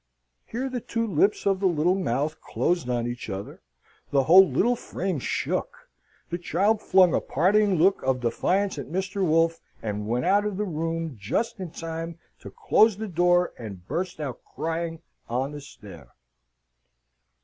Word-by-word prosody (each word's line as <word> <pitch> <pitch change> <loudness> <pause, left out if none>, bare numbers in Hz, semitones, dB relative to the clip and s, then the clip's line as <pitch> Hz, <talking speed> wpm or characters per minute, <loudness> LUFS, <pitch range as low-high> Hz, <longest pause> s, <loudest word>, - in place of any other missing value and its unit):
Here 250 +4 -3
the 255 -2 -4
two 230 +1 -2
lips 200 +1 +1
of 195 -1 +2
the 195 - +2
little 170 +1 +2
mouth 155 -4 -1
closed 175 -7 -1
on 120 -1 0
each 120 -1 -5
other: 95 0 -6 0.5
the 140 -1 +3
whole 185 +6 +7
little 245 +4 +2
frame 190 -7 -3
shook: 120 - -3 0.4
the 175 - -2
child 205 +5 +1
flung 185 -3 +5
a - - +2
parting 200 +5 +2
look 185 +4 +3
of 130 -1 0
defiance 180 +10 0
at - - -6
Mr. 190 +3 -2
Wolfe, 165 0 +2 0.2
and 105 -1 -4
went 120 +3 0
out 200 +2 +4
of 210 -2 -3
the 210 - -1
room, 165 -3 -3
just 155 - -2
in 185 -2 -5
time 165 0 -6 0.2
to - - -10
close 225 - +3
the 220 +1 -4
door, 175 0 +2
and 100 -6 -9
burst 185 -1 -3
out 140 -5 -5
crying 165 0 -4 0.3
on 130 +4 -1
the 145 0 -7
stair. 105 -8 -13
170 Hz, 165 wpm, -26 LUFS, 140-195 Hz, 0.5 s, whole